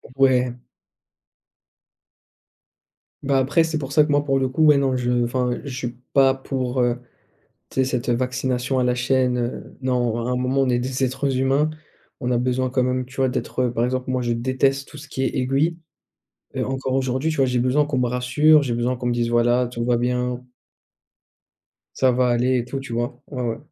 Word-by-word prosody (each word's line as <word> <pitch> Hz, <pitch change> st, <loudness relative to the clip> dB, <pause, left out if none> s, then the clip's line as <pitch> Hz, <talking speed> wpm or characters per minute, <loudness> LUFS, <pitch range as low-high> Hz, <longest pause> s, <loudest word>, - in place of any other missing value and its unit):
Ouais. 130 Hz, -2 st, +3 dB, 2.7 s
Bah, 140 Hz, -1 st, +2 dB
après, 140 Hz, +5 st, +3 dB
c'est 160 Hz, -1 st, -2 dB
pour 140 Hz, -2 st, -5 dB
ça 150 Hz, -, +6 dB
que, 150 Hz, -, -3 dB
moi, 145 Hz, 0 st, +3 dB
pour 135 Hz, -1 st, +2 dB
le 130 Hz, -1 st, 0 dB
coup, 155 Hz, +4 st, +2 dB
ouais, 150 Hz, -1 st, +7 dB
non 135 Hz, -2 st, +1 dB
je 120 Hz, -1 st, +1 dB
enfin, 125 Hz, +1 st, 0 dB
je 140 Hz, -, -6 dB
suis 120 Hz, -2 st, -5 dB
pas 135 Hz, -1 st, +5 dB
pour, 130 Hz, -1 st, -2 dB
heu, 120 Hz, 0 st, +1 dB, 0.7 s
tu -, -, -1 dB
sais 130 Hz, -, +3 dB
cette, 125 Hz, -2 st, -2 dB
heu, 120 Hz, -, +3 dB
vaccination 130 Hz, +1 st, -1 dB
à 125 Hz, -, +2 dB
la 125 Hz, -, +2 dB
chaîne, 125 Hz, 0 st, +1 dB
heu, 120 Hz, 0 st, -5 dB
non, 120 Hz, -3 st, 0 dB
à 125 Hz, -, -2 dB
un 125 Hz, -, 0 dB
moment 130 Hz, +2 st, 0 dB
on 135 Hz, -, +2 dB
est 120 Hz, -1 st, +2 dB
des 130 Hz, +2 st, -3 dB
êtres 135 Hz, +1 st, 0 dB
humains, 135 Hz, +3 st, +2 dB, 0.5 s
on 125 Hz, -, -2 dB
a 120 Hz, -, +2 dB
besoin 125 Hz, +1 st, 0 dB
quand 130 Hz, -1 st, +1 dB
même 130 Hz, 0 st, -1 dB
tu 130 Hz, -, -15 dB
vois 130 Hz, -1 st, +2 dB
d'être, 130 Hz, 0 st, -2 dB
heu 120 Hz, -, 0 dB
par 120 Hz, 0 st, 0 dB
exemple, 130 Hz, +1 st, -2 dB
moi, 130 Hz, -1 st, 0 dB
je 120 Hz, -, -2 dB
déteste 135 Hz, +3 st, 0 dB
tout 150 Hz, -, -11 dB
ce 145 Hz, +1 st, -11 dB
qui 135 Hz, -1 st, -2 dB
est -, -, -1 dB
aiguille. 135 Hz, +6 st, +1 dB, 0.8 s
Heu, -, -, 0 dB
encore 130 Hz, 0 st, -2 dB
aujourd'hui, 130 Hz, +2 st, 0 dB
tu 155 Hz, -, -3 dB
vois? 135 Hz, -, +3 dB
J'ai 125 Hz, -1 st, 0 dB
besoin 130 Hz, +4 st, +2 dB
qu'on 145 Hz, -3 st, -2 dB
me 125 Hz, -, +2 dB
rassure, 125 Hz, +5 st, +4 dB
j'ai 130 Hz, -4 st, -2 dB
besoin 120 Hz, +2 st, 0 dB
qu'on 120 Hz, 0 st, -3 dB
me -, -, +1 dB
dise: 120 Hz, -1 st, 0 dB
«Voilà, 120 Hz, +1 st, +3 dB
tout 120 Hz, -1 st, -4 dB
va 120 Hz, -1 st, +2 dB
bien». 125 Hz, 0 st, -1 dB, 1.5 s
«Ça 130 Hz, -1 st, +3 dB
va 125 Hz, 0 st, +2 dB
aller», 125 Hz, +2 st, +2 dB
et 120 Hz, -, -2 dB
tout 135 Hz, +2 st, -4 dB
tu 130 Hz, -3 st, -7 dB
vois? 120 Hz, +2 st, -3 dB
Ouais, 130 Hz, -4 st, -4 dB
ouais. 115 Hz, -1 st, -2 dB
130 Hz, 215 wpm, -22 LUFS, 125-135 Hz, 2.7 s, ouais